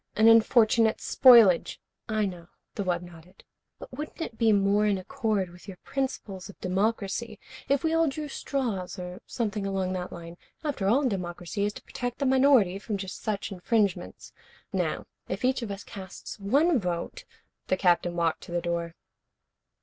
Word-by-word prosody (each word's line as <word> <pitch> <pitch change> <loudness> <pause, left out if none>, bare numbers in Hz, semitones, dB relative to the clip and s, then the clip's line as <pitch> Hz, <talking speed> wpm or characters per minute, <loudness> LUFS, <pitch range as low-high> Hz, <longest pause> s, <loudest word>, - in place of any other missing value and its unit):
An 220 +1 +5
unfortunate 225 0 +5
spoilage 235 -9 +6 0.2
" - - -43
"I 210 - +3
know." 175 -3 -6 0.3
The 205 - -3
wub 180 -2 -1
nodded. 175 +1 -15 0.3
"But - - -11
wouldn't 300 +3 -7
it 280 -9 -4
be 225 -1 +3
more 205 +1 +3
in 200 -2 +2
accord 210 -3 -2
with 175 +3 -16
your 190 -2 -8
principles 215 -8 -4
of 200 - -13
democracy 205 +3 -1 0.3
if 275 -1 +2
we 320 0 +1
all 325 0 +3
drew 300 +2 -3
straws, 235 -10 -3
or 180 +2 -7
something 210 -4 -2
along 190 -1 -1
that 180 -1 -4
line? 170 0 -9 0.3
After 280 -11 -2
all, 260 +6 +3
democracy 180 -1 -3
is 205 - -2
to - - -11
protect 245 -1 -5
the 280 - -1
minority 260 -8 +4
from 210 0 -3
just 190 -1 -7
such 210 -1 -3
infringements. 195 -1 -1 0.4
Now, - - -1 0.2
if - - -2
each 260 0 +1
of 230 - -4
us 200 0 -6
casts 195 +1 -9
one 280 - +3
vote 175 -3 -4 0.2
" - - -49
The 185 - +1
Captain 175 -1 +2
walked 170 -2 0
to - - -11
the 175 - 0
door. 170 -1 -3
200 Hz, 175 wpm, -27 LUFS, 180-235 Hz, 0.4 s, spoilage